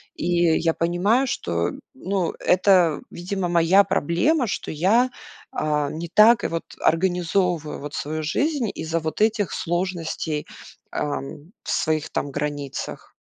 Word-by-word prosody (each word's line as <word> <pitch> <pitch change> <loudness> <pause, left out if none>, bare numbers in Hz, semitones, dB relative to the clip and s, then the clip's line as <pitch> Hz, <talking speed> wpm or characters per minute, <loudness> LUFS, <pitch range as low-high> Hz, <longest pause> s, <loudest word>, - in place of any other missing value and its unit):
И 170 -1 +2
я 165 -1 +1
понимаю, 190 +10 +2
что, 85 - -1 0.2
ну, 185 +4 -2
это, 180 -4 +3
видимо, 180 +1 -3
моя 175 +3 +5
проблема, 240 - +1
что - - -4
я, 210 +11 +3 0.4
а, 150 -1 0
не 165 +1 -6
так 225 +4 +6
вот 165 0 -3 0.2
организовываю 175 -2 +1
вот 145 0 -7
свою 155 +2 -3
жизнь 270 - 0
из-за 160 +1 -2
вот 160 +5 -4
этих 215 -3 +2
сложностей, 170 -3 -2 0.5
э, - - 0 0.6
своих 155 -2 -1
там 145 - -2
границах. 145 -1 -5
170 Hz, 120 wpm, -23 LUFS, 155-195 Hz, 0.6 s, так